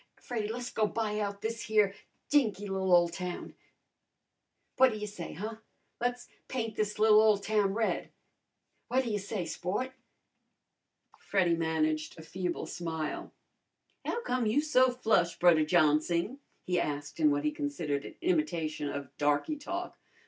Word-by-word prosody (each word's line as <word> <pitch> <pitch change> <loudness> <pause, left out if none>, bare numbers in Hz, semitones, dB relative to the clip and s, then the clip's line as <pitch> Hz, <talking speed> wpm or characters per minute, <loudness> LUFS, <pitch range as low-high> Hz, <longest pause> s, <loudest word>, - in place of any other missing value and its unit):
Freddy, 225 -4 -3
le's 245 +1 -5
go 215 -2 +2
buy 215 -1 -2
out 200 -1 -3
this 230 +1 -3
here 210 -3 +3 0.3
dinky 220 -9 +2
li'l 190 -1 -1
ole 175 -1 +7
town. 180 +1 -5 1.2
What 260 0 +8
ta 225 - -4
ya 210 0 -4
say, 200 -5 -7
huh? 215 +6 -5 0.4
Le's 245 0 -2 0.2
paint 225 -4 -3
this 210 -1 -1
li'l 215 0 +7
ole 215 -2 +5
town 205 -1 +1
red! 225 -1 0 0.8
What 260 +2 +2
ta 235 - -3
ya 205 - 0
say, 200 -2 -3
sport?" 205 +11 -2 1.3
Freddy 180 -4 +2
managed 155 -1 0
a 160 - -9
feeble 180 +2 -3
smile. 160 -3 -4 0.7
"How 475 - -2
come 250 - 0
you 220 +7 +3
so 275 -4 +4
flush, 220 -8 +1
Brudder 165 -3 +5
Johnsing?" 170 - +2 0.2
he 180 -1 +1
asked 145 0 -3
in 155 -2 +5
what 145 0 +1
he 150 - +1
considered 145 0 -2
an - - -9
imitation 170 - 0
of 140 -2 -6
darky 145 - +1
talk. 345 +5 -5
200 Hz, 150 wpm, -31 LUFS, 165-230 Hz, 1.3 s, What